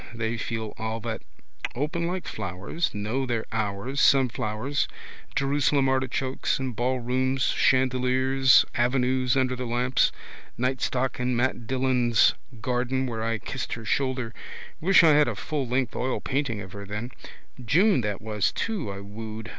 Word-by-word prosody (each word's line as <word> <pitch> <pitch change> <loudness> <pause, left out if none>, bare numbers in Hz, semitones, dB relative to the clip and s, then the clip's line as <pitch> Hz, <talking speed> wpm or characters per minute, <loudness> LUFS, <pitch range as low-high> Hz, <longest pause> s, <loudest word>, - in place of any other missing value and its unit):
They 115 0 -1
feel 110 -1 -4
all 110 0 -2
that. 115 0 -4 0.5
Open 155 +6 -1
like 180 +1 -3
flowers, 95 - -3
know 110 +6 -2
their 115 -2 -1
hours, 110 +5 -2
sunflowers, 125 0 +2 0.5
Jerusalem 140 0 +2
artichokes, 130 0 0
in 130 -1 -3
ballrooms, 130 +2 0
chandeliers, 130 +1 +4
avenues 125 +1 +2
under 130 -1 +1
the 125 0 -4
lamps. 125 +2 +2 0.5
Nightstock 130 0 -1
in 125 0 0
Mat 120 -1 0
Dillon's 125 -3 +3 0.3
garden 125 +2 0
where 115 -3 -3
I 115 0 0
kissed 130 +3 -5
her 115 -1 -6
shoulder. 130 0 -1 0.5
Wish 180 +1 +6
I 165 - +7
had 150 0 +5
a - - -2
full 145 -4 -3
length 125 -1 0
oilpainting 130 -3 -1
of 95 - -11
her 100 +1 -8
then. 105 +5 -5 0.5
June 175 - +4
that 105 -2 -3
was 105 -3 0
too 210 - -2
I 100 0 -7
wooed. 110 +2 -7
125 Hz, 140 wpm, -26 LUFS, 115-130 Hz, 0.5 s, I